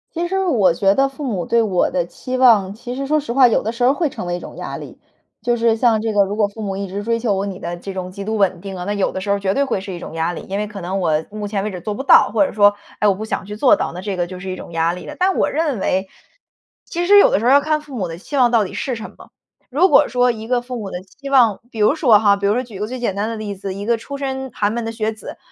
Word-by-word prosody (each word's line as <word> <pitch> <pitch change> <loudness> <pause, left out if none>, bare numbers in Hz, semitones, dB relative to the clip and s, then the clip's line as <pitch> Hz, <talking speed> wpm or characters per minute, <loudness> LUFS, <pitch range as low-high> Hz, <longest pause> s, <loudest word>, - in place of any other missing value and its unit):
其 340 +1 -1
实 385 +2 -1
我 215 - +3
觉 195 +3 +3
得 275 +5 +3
父 270 +2 -9
母 205 -10 -2
对 235 0 +2
我 190 -5 +1
的 175 -2 -1
期 255 +8 -6
望， 225 -7 +4
其 240 +3 -7
实 275 0 -3
说 305 +2 +2
实 290 -5 -3
话， 255 +1 +6
有 230 - +1
的 220 - -1
时 235 +1 -10
候 255 - +6
儿 - - 0
会 310 +1 0
成 220 - -7
为 175 - -1
一 - - -5
种 - - -10
压 - - -5
力。 - - -10 0.4
就 240 -1 +1
是 230 -1 +2
像 225 -2 +3
这 225 0 -1
个 205 -2 +3
如 200 +2 -4
果 210 -1 +2
父 220 +2 -10
母 195 -2 -3
一 200 - -3
直 195 +2 -5
追 230 +2 0
求 230 -3 0
我 195 +1 -1
你 190 -2 -5
的 175 -2 -4
这 195 +3 -7
种 185 -1 -5
极 200 +2 -7
度 220 +1 -2
稳 195 -4 +1
定 195 +1 -7
啊， 180 - -5
那 205 +3 -2
有 200 -2 0
的 190 - -4
时 200 - -5
候 200 - +3
儿 - - -7
绝 195 -1 0
对 280 - +2
会 250 -7 -1
是 190 0 -7
一 175 - -6
种 - - -8
压 165 +2 -1
力。 - - -6
因 195 - -2
为 210 +1 -2
可 205 -2 -8
能 185 +3 -2
我 160 -3 +1
目 210 0 -5
前 200 -1 -2
为 210 - -3
止 180 - -6
做 210 +5 -4
不 265 - -5
到， - - +6
或 295 - +4
者 - - -4
说， 205 -1 +4 0.2
哎， 210 - +3
我 200 - +3
不 210 - -6
想 220 - -3
去 210 +1 -7
做 255 +7 +4
到， - - -3
那 180 - -6
这 195 -1 -4
个 175 - -1
就 185 +1 -8
是 185 +1 -7
一 185 - -3
种 170 - -10
压 165 0 +1
力 180 0 -7
了。 300 - -8
但 375 +1 +1
我 - - +2
认 300 -7 -1
为， 190 +1 -1 0.7
其 345 +1 -3
实 410 +1 +7
有 405 - +7
的 - - +2
时 225 - -3
候 250 - +5
儿 - - +7
要 285 - +6
看 310 +1 0
父 295 -3 -11
母 190 -7 -2
的 165 - -6
期 240 +11 -7
望 250 -3 +4
到 225 -3 +3
底 - - -8
是 265 - -3
什 225 -1 -8
么。 - - -15 0.4
如 300 +8 +4
果 300 - +5
说 250 0 +2
一 220 -2 -3
个 245 +1 0
父 250 +1 -7
母 205 -4 -6
的 180 - -4
期 275 +9 -11
望， 240 -7 +4
比 225 - -8
如 215 +7 +4
说 245 -10 +5
哈， 205 -1 +4
比 200 0 -4
如 200 - +3
说 245 - 0
举 235 -6 -10
个 210 - -1
最 250 +3 -6
简 220 -6 -1
单 205 +2 -1
的 230 - -4
例 210 -2 -5
子， 195 0 -5
一 200 +1 -6
个 235 +1 +2
出 280 +5 -7
身 265 -1 -4
寒 205 0 0
门 235 0 -2
的 225 - -3
学 220 -1 -2
子， 215 - -10
215 Hz, 365 characters per minute, -19 LUFS, 195-250 Hz, 0.7 s, 实